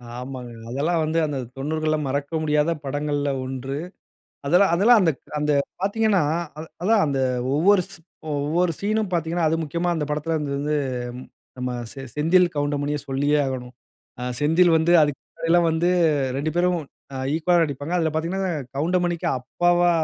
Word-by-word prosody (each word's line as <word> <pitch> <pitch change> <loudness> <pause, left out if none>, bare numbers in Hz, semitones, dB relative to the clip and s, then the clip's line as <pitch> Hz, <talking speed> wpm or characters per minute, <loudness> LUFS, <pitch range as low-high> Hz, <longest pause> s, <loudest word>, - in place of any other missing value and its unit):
ஆமாங்க, 125 -1 -7 0.2
அதெல்லாம் 150 +7 0
வந்து 160 +2 0
அந்த 145 -2 -3 0.2
90 155 +2 -1
மறக்க 140 +2 -2
முடியாத 150 +1 +2
படங்கள்ல 145 +1 -1 0.2
1. 130 +1 -4 0.7
அதெல்லாம் 180 +5 +4
அதெல்லாம் 220 +6 +6
அந்த 175 -4 +4 0.3
அந்த 150 0 +1 0.3
பாத்தீங்கணா, 205 -1 +2 0.4
அத 155 - -5 0.2
அதான் 210 +2 +4
அந்த 140 -2 -1 0.4
ஒவ்வொரு 185 +6 +4
சீ 195 - -10 0.4
ஒவ்வொரு 165 +5 +1
சீன்னும் 215 0 -1
பாத்தீங்கணா, 165 0 0
அது 160 - +1
முக்கியமா 170 +3 -1
அந்த 160 -3 -1
படத்துல 150 +2 -1
வந்து 145 -2 -3
வந்து 150 +2 0 0.8
நம்ப 125 0 -2 0.2
செ 135 - -9
செந்தில் 175 +4 +4
கவுண்டமணிய 145 0 -1
சொல்லியே 145 +2 +1
ஆகணும். 125 -1 -5 0.5
அ - - -5 0.2
செந்தில் 165 +3 +4
வந்து 160 +2 +3
அதுக்கு 145 -2 0
முன்னாடிலாம் 170 +1 +1
வந்து 160 +2 +1 0.5
2 145 +3 -1
பேரும் 180 0 +2 0.4
அ - - -4 0.2
ஈக்வாலா 170 +1 +3
நடிப்பாங்கா. 145 +3 -3
அதுல 160 -2 0
பாத்தீங்கனா 180 +4 -1 0.2
கவுண்டமணிக்கு 175 +2 0
அப்பாவா 175 +7 +2
160 Hz, 145 wpm, -23 LUFS, 145-175 Hz, 0.8 s, அதெல்லாம்